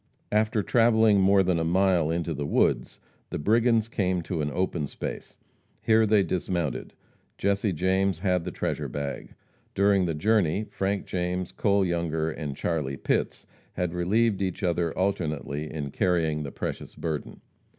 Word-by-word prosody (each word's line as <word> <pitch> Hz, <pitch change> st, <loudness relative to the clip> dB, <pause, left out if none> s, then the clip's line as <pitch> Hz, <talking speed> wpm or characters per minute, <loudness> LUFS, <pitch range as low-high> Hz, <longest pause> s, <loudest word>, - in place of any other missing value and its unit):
After 105 Hz, 0 st, +2 dB
travelling 110 Hz, -3 st, +4 dB
more 95 Hz, 0 st, +5 dB
than 90 Hz, -2 st, +1 dB
a -, -, 0 dB
mile 90 Hz, -1 st, +2 dB
in 85 Hz, +1 st, 0 dB
the 80 Hz, -3 st, -3 dB
woods, -, -, +1 dB, 0.3 s
the -, -, -3 dB
brigands 115 Hz, +5 st, +2 dB
came 95 Hz, -6 st, -1 dB
to 80 Hz, -2 st, -3 dB
an 75 Hz, -, -1 dB
open 85 Hz, -3 st, -1 dB
space. -, -, -7 dB, 0.4 s
Here 110 Hz, -1 st, +3 dB
they 105 Hz, -1 st, +4 dB
dismounted. 85 Hz, -5 st, -2 dB, 0.4 s
Jesse 100 Hz, +1 st, +1 dB
James 95 Hz, +2 st, +1 dB
had 90 Hz, -1 st, 0 dB
the -, -, -4 dB
treasure -, -, -3 dB
bag. 70 Hz, -1 st, -5 dB, 0.4 s
During 100 Hz, -1 st, +3 dB
the 80 Hz, -, -1 dB
journey, 105 Hz, +1 st, +2 dB
Frank 100 Hz, +1 st, -1 dB
James, 90 Hz, 0 st, -2 dB
Cole 100 Hz, -1 st, +2 dB
Younger 80 Hz, -2 st, -1 dB
and 75 Hz, -3 st, -5 dB
Charlie 75 Hz, -5 st, -2 dB
Pitts -, -, -1 dB, 0.3 s
had 90 Hz, -1 st, -2 dB
relieved 100 Hz, +4 st, +1 dB
each 95 Hz, 0 st, -2 dB
other 85 Hz, -2 st, +1 dB
alternately 80 Hz, -6 st, -2 dB
in 70 Hz, -3 st, -4 dB
carrying 80 Hz, -4 st, +1 dB
the 70 Hz, -2 st, -5 dB
precious -, -, -5 dB
burden. 80 Hz, -3 st, -4 dB
90 Hz, 150 wpm, -26 LUFS, 80-100 Hz, 0.4 s, more